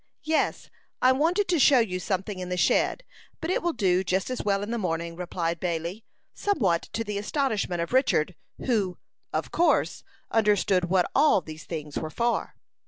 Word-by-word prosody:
"Yes; 315 +1 0 0.3
I 255 - +5
wanted 330 +9 +2
to 345 -3 +3
show 275 -1 +6
you 195 -7 +1
something 190 +1 -3
in 180 0 -5
the 180 - -2
shed, 340 - +2 0.4
but 325 +2 -2
it - - +1
will 345 - +1
do 185 - +2
just 190 +5 -1
as 255 - -2
well 200 -1 +1
in 210 - -4
the 235 - -1
morning," 170 -3 -2
replied 170 -1 -3
Bailey, 170 +4 -3 0.3
somewhat 200 - 0
to 225 - -1
the 210 -2 -3
astonishment 210 - -1
of 170 - -7
Richard, 220 - +2 0.3
who, 205 -8 0 0.3
of - - -2
course, 345 - +2 0.3
understood 205 -4 +3
what 180 0 +2
all 295 -5 +5
these 155 -1 -10
things 150 -3 -5
were 155 - -4
for. 235 +7 -1
195 Hz, 175 wpm, -26 LUFS, 175-255 Hz, 0.4 s, show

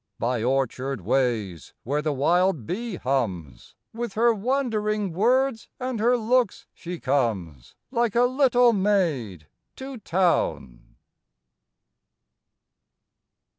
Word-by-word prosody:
By 120 0 -1
orchard 130 0 -1
ways, 110 - -1
where 145 +5 -1
the 155 0 -1
wild 165 - +1
bee 220 - -4
hums, 110 - -3 0.2
With 235 -2 -4
her 235 +2 +3
wondering 215 -4 -1
words 245 +5 +1
and 255 -3 -3
her 240 +3 +3
looks 240 -1 +1
she 175 0 -7
comes, 105 - -2 0.2
Like 235 -4 0
a 240 - +4
little 250 -2 +4
maid 165 - 0 0.3
to 265 -2 -8
town. 165 - -1
180 Hz, 100 wpm, -25 LUFS, -, 0.3 s, a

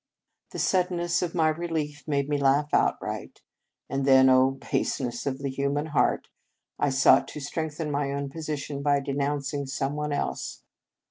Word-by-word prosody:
The - - -8
suddenness 175 -2 +1
of 175 -1 -3
my 160 -2 +3
relief 155 -2 -3
made 140 -2 0
me 145 -1 0
laugh 140 +2 +2
outright, - - 0 0.5
and 135 0 -2
then, 130 -1 +6
Oh, 130 +1 +4
baseness 120 -2 -1
of 130 -1 -1
the 140 0 -3
human 140 +2 -1
heart! 155 -2 +1 0.5
I 145 - +2
sought 135 0 +5
to - - -7
strengthen 150 +1 -3
my 140 -1 -1
own 140 0 -3
position 150 -2 -4
by 145 0 +3
denouncing 140 0 -2
some 135 +1 -2
one 150 0 -2
else. 145 - -3
145 Hz, 155 wpm, -27 LUFS, 140-150 Hz, 0.5 s, then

